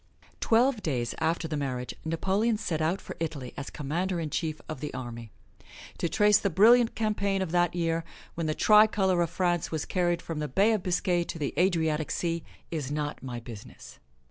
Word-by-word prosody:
Twelve 240 0 +3
days 125 -9 -1
after 160 +1 0
the 155 - -3
marriage, 130 -3 -3
Napoleon 195 +8 0
set 160 -7 -2
out 165 +5 +1
for - - -8
Italy 150 -6 -4
as 140 - -6
Commander 170 +5 -2
in 155 -3 -4
Chief 155 -2 -2
of 155 - -6
the 150 - -4
army. 120 -2 -7 0.7
To 170 - 0
trace 210 +1 +4
the 200 - 0
brilliant 230 +6 +5
campaign 200 -3 0
of 175 - -5
that 175 0 +2
year, 165 -1 0 0.3
when 165 -1 -3
the 155 - -1
tricolor 210 -4 +4
of 170 - +1
France 175 -2 0
was 160 -2 -2
carried 175 -2 0
from 165 -2 -4
the 150 - -2
Bay 200 +8 +3
of 215 - 0
Biscay 180 -1 +1
to - - -6
the 145 -3 -2
Adriatic 160 -3 +1
Sea, 170 -1 -2 0.3
is 150 -5 -3
not 150 0 -3
my 125 -2 -5
business. 115 -3 -11
165 Hz, 190 wpm, -28 LUFS, 150-190 Hz, 0.7 s, brilliant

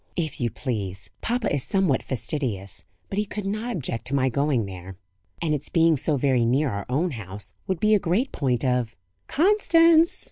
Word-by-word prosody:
"If 155 -6 -3
you 120 - +1
please. 100 -6 -4
Papa 240 -4 -1
is 140 -3 +1
somewhat 190 -9 +1
fastidious; 105 - -3 0.3
but 195 - -1
he 210 - 0
could 210 0 -5
not 215 +5 -2
object 120 -7 -4
to 140 - -1
my 130 -1 +2
going 135 -3 +1
there; 95 -1 -9 0.5
and 155 -2 +1
its 145 - -3
being 165 -1 +4
so 145 +1 +1
very 130 -2 +2
near 130 +4 +2
our 100 -1 -5
own 160 +7 +1
house 105 -4 -7
would 185 -3 -1
be 215 +3 +3
a 210 - +5
great 195 +9 0
point 130 -2 0
of 125 -3 0 0.2
" 90 - -47
"Constance!" 335 -3 +5
140 Hz, 190 wpm, -25 LUFS, 115-195 Hz, 0.5 s, a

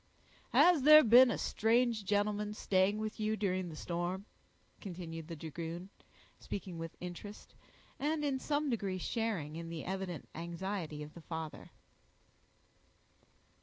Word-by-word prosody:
"Has 350 -5 +6
there 305 +2 +9
been 245 +3 +8
a - - 0
strange 230 -1 +1
gentleman 210 +1 0
staying 195 0 +2
with 215 0 -4
you 215 0 0
during 185 -3 -1
the 160 - -8
storm?" 175 +4 -3 0.5
continued 165 -4 -7
the 170 - -6
dragoon, 165 +4 -6 0.5
speaking 185 -4 -6
with 165 0 -7
interest, 180 +4 -8 0.5
and 300 +1 0
in 270 -2 0
some 295 +2 0
degree 200 -5 -1
sharing 185 -7 -2
in 165 0 -6
the 165 -1 -6
evident 190 -4 -4
anxiety 170 -2 -4
of 150 - -10
the 170 - -11
father. 160 -1 -6
190 Hz, 130 wpm, -34 LUFS, 170-220 Hz, 0.5 s, there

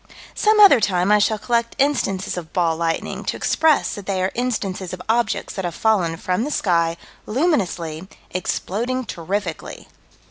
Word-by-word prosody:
Some 430 0 +3
other 390 - +8
time 185 -2 +1
I 210 - +6
shall 215 +1 +2
collect 235 +2 -1
instances 205 -9 0
of 170 -3 -7
"ball 170 -3 +1
lightning," 165 0 -2
to - - -2
express 320 -2 +2
that 205 -2 -8
they 195 -2 -1
are 185 - 0
instances 200 -7 -3
of 180 - -6
objects 225 0 0
that 190 - -4
have 175 -1 -3
fallen 185 -7 +1
from 185 +4 -1
the 290 - -2
sky, 170 - +1 0.3
luminously, 190 - -1 0.2
exploding 235 +7 -2
terrifically. 180 -1 -5
200 Hz, 155 wpm, -21 LUFS, 175-240 Hz, 0.3 s, other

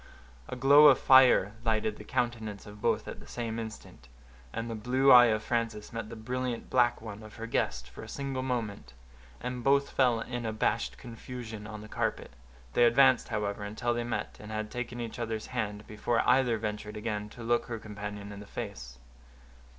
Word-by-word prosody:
A - - -4
glow 140 +4 +7
of 135 -4 +7
fire 130 -6 +6
lighted 110 -2 0
the - - -10
countenance 115 -4 -2
of 105 0 -12
both - - +1
at - - -7
the - - -14
same 115 -1 -4
instant, 110 - -9 0.4
and 115 +7 -4
the 115 - -4
blue 130 +5 +3
eye 120 -1 +10
of 110 -1 0
Frances 115 -3 -2
met 115 -2 -5
the 115 - -7
brilliant 125 +2 -4
black 120 -3 +3
one 110 -1 -7
of 110 -1 -12
her 115 - -6
guest 65 - -1
for 65 - -11
a - - -9
single 135 -2 -3
moment, 110 - -3 0.5
and 125 -1 -4
both 140 +1 +3
fell 125 -4 +3
in 120 +1 -4
abashed 110 - -1
confusion 115 - -8
on 105 -1 -8
the 110 - -10
carpet; - - -2 0.4
they 120 - +5
advanced, 130 +1 +5
however, 105 -1 -2
until 110 +4 -2
they 120 0 -2
met, 120 - -4
and 105 +1 -9
had 110 0 -4
taken 120 0 -5
each 115 0 -5
other's 110 -2 -3
hand, 105 -3 -3
before 110 +2 -1
either 125 -2 +4
ventured 105 -1 -5
again 105 -1 -3
to 120 +2 -10
look 120 +1 +1
her 115 -1 -4
companion 105 -1 -7
in 100 - -8
the 105 - -11
face. 80 - -7
115 Hz, 190 wpm, -30 LUFS, 105-120 Hz, 0.5 s, eye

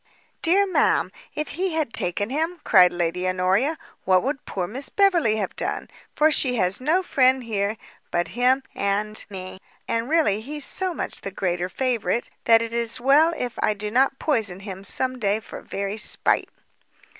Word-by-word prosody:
"Dear 380 +4 +4
ma'am, 380 - +2 0.2
if 305 0 -3
he 365 +2 -2
had 305 -7 -1
taken 205 +6 0
him," 325 +5 -2
cried 180 -4 +6
Lady 175 +1 -1
Honoria, 190 - +1 0.3
"what 185 -1 +3
could 275 +1 -3
poor 185 -2 -3
Miss 255 +9 -2
Beverley 350 - +3
have 205 -4 -3
done? - - -4 0.2
for 310 +1 +4
she 255 -4 +2
has 190 0 +1
no 330 +8 +2
friend 260 -5 +3
here 210 -1 -2 0.3
but 175 0 -1
him 255 +2 +2
and 205 +2 -1
me, 185 -1 -8 0.3
and 230 +2 -1
really 300 -11 +2
he's 290 +4 -3
so 370 -2 -1
much - - -5
the - - -4
greater 180 -2 -2
favourite, 240 +1 -1
that 230 0 +6
it 230 0 -6
is 235 0 0
well 285 +6 +5
if 245 -2 -4
I 215 - +2
do 210 +1 -5
not 270 +3 +2
poison 220 - -1
him 195 -1 -8
some 255 +5 -2
day 205 -1 +1
for 220 - -10
very 200 +1 -4
spite." 215 - +1
230 Hz, 175 wpm, -23 LUFS, 195-285 Hz, 0.3 s, cried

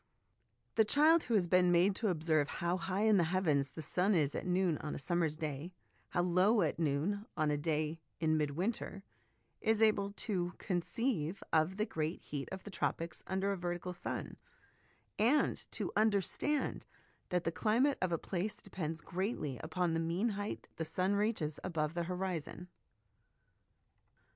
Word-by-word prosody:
The 220 - +7
child 310 +8 +5
who 235 - +1
has 190 -4 +4
been 180 +1 +4
made 180 +3 +4
to 225 - 0
observe 155 -4 +2
how 170 +4 -1
high 185 +3 -1
in 215 -2 +5
the 175 - +4
heavens 160 -6 +1
the 160 - -8
sun 185 +7 +2
is 150 -4 +2
at - - -4
noon 180 -3 +2
on 150 - -4
a - - -4
summer's 165 0 0
day, 155 +2 -4 0.4
how 175 - +1
low 185 +4 +4
at 160 - -1
noon 165 +8 0
on 155 -1 +2
a - - +2
day 155 +1 -1 0.2
in 155 -1 +2
mid 150 -2 0
winter, 195 0 -2 0.6
is 220 -1 +2
able 210 -3 +3
to 180 -5 -2
conceive 195 - -1
of 160 +4 +3
the 215 - +1
great 160 -4 -2
heat 145 -2 -5
of 190 0 -6
the 205 - -8
tropics 165 -3 -2
under 190 +1 0
a 200 - -1
vertical 175 0 -3
sun, 175 - -5 0.8
and 245 +8 +2
to - - -3
understand 220 - +1 0.4
that 180 -1 +1
the 165 - 0
climate 240 - +2
of 185 -2 +1
a 170 - +2
place 195 +6 -3
depends 170 -6 -5
greatly 175 - -3
upon 170 +1 -1
the 165 - +1
mean 170 +8 0
height 205 0 -4
the 160 - -1
sun 185 +4 0
reaches 205 -8 0
above 160 -4 -1
the 170 0 -1
horizon. 180 -1 -3
180 Hz, 165 wpm, -34 LUFS, 160-205 Hz, 0.8 s, The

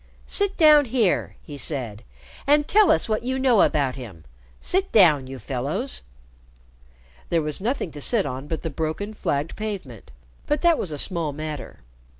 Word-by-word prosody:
"Sit 405 -1 0
down 305 -3 +7
here," 230 -6 0
he 145 -3 -9
said, 120 -7 -4 0.4
"and 295 +1 +4
tell 425 -1 +5
us 160 - +3
what 215 -1 0
you 260 +2 -2
know 255 -5 +4
about 140 -4 +2
him. 105 -11 -10 0.4
Sit 380 +1 -1
down, 155 -11 +5
you 135 0 -7
fellows." 140 - -3 1.3
There 165 -2 +1
was 150 +4 -3
nothing 230 - -2
to 145 - -9
sit 215 - +2
on 135 +1 -5
but 160 - -4
the 165 - -3
broken 160 +8 -3
flagged 145 -6 -2
pavement, 190 - -6 0.4
but 295 -1 0
that 340 -2 +4
was 175 - -2
a 150 - -4
small 165 -1 0
matter. 155 - -7
165 Hz, 165 wpm, -23 LUFS, -, 1.3 s, down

